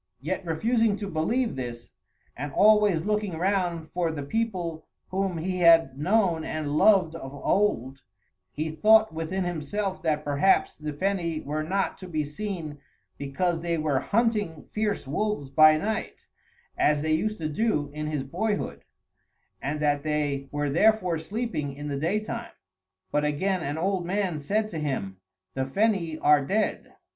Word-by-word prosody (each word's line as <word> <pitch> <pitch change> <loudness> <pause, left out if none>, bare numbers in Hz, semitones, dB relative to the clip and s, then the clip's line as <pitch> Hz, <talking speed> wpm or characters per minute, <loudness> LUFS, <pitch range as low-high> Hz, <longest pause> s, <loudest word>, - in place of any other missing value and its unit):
Yet 180 +8 -3
refusing 220 +6 +1
to 205 -1 -5
believe 225 +9 0
this, 120 -2 -6 0.4
and 145 +3 -5
always 210 -5 +5
looking 210 -2 -1
round 175 -4 -1
for 175 -2 0
the 145 -3 -5
people 175 -3 -3 0.2
whom 190 -2 -1
he 180 +3 -2
had 165 -6 +6
known 175 +1 +1
and 155 -2 -3
loved 185 -2 +5
of 135 -5 -7
old, 135 - 0 0.5
he 155 +4 -3
thought 215 +5 +5
within 165 +4 -2
himself 180 +4 -3
that 155 -3 0
perhaps 145 +7 +2
the 150 0 -5
Feni 170 0 -2
were 150 +2 -2
not 190 +5 -1
to 185 - -8
be 155 -3 -1
seen 155 -1 -5 0.4
because 165 +5 -1
they 170 0 -1
were 150 -4 +1
hunting 210 - 0
fierce 210 -5 -1
wolves 150 -2 -2
by 155 +2 +7
night, 215 +6 -3 0.5
as 150 0 +2
they 155 0 +1
used 215 +7 0
to 160 - -3
do 150 -4 0
in 150 0 -4
his 150 -3 -2
boyhood, 205 +10 -3 0.8
and 145 +3 -2
that 145 -1 +2
they 145 -2 -1
were 145 -1 -1
therefore 185 -1 +3
sleeping 165 - -3
in 145 +1 -6
the 140 -1 -2
daytime; 205 +8 -2 0.6
but 150 - +1
again 180 +6 0
an 145 0 -3
old 185 +2 0
man 185 -4 -1
said 210 +9 0
to 165 - -5
him, 130 -11 -3 0.4
"The 130 0 -1
Feni 180 -1 +1
are 150 -1 +5
dead." 210 +9 -1
165 Hz, 155 wpm, -26 LUFS, 150-200 Hz, 0.8 s, by